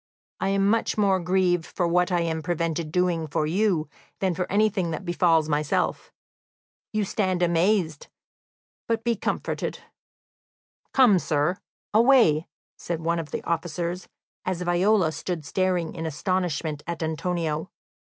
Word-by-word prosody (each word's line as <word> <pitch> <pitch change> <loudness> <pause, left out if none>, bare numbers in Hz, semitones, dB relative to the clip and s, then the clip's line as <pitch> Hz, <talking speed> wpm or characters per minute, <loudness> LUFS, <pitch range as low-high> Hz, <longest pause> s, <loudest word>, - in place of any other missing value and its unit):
I - - 0
am 195 0 +2
much 225 +2 +1
more 195 -3 +3
grieved 180 -1 +2
for 175 - -1
what 180 +1 +2
I 175 -1 +2
am 160 -1 -1
prevented 165 -1 -2
doing 175 -2 +1
for 150 +1 0
you 175 -1 +1 0.3
than 190 -2 0
for 180 +1 -3
anything 200 -3 +2
that 160 +3 -5
befalls 170 -3 +3
myself. 150 -1 -1 0.8
You 215 -1 0
stand 185 -3 0
amazed, 170 -2 +1 0.8
but 230 -1 0
be 235 0 +1
comforted." - - -3 1.1
"Come, 240 -8 +5
sir, 155 +4 0 0.3
away," 225 - +5 0.3
said 170 -2 -4
one 170 +1 0
of 160 -2 -5
the - - -4
officers, 170 +2 -3 0.4
as 180 -1 -2
Viola 180 0 +3
stood 160 +1 -4
staring 180 -1 0
in 165 -2 -4
astonishment 160 -2 -2
at 170 -1 -3
Antonio. 160 0 -2
175 Hz, 135 wpm, -25 LUFS, 160-190 Hz, 1.1 s, Come